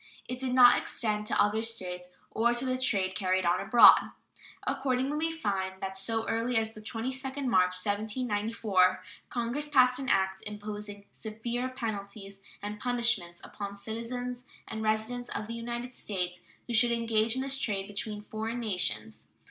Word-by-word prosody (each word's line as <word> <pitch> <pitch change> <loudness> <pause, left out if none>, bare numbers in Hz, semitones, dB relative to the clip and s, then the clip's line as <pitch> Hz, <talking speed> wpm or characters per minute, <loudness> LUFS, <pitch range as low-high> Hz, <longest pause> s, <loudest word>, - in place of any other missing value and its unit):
It 250 0 -5
did 255 -1 -1
not 245 -1 +8
extend 210 -2 -1
to - - +1
other 205 +2 +3
States 180 -6 -3 0.2
or 235 +2 +2
to 240 +2 -1
the 255 0 -1
trade 195 -7 +1
carried 185 -1 0
on 175 +1 +3
abroad. 240 - +7 0.6
Accordingly, 265 +1 0
we - - -3
find 195 -11 -2
that 190 0 -4
so 225 +4 -1
early 230 +1 0
as 220 0 0
the 215 - -11
22d 260 +5 -3
March, 185 -6 +3
1794, 210 -3 +1 0.3
Congress 250 +5 -2
passed 255 -3 +5
an 270 0 -3
act 190 0 +1
imposing 210 -1 -7
severe 235 +3 -4
penalties 200 -5 -6 0.2
and 210 0 -5
punishments 235 -8 0
upon 200 -1 -6
citizens 245 +3 -5 0.2
and 220 - -5
residents 220 +3 -1
of - - -4
the 230 - -6
United 240 +2 -5
States 180 -6 -3 0.3
who 240 - -5
should 235 +1 +5
engage 230 -1 +1
in 260 - -1
this 270 0 0
trade 200 -7 -1
between 210 0 -4
foreign 220 +3 -4
nations. 110 - -2
220 Hz, 155 wpm, -30 LUFS, 200-245 Hz, 0.6 s, not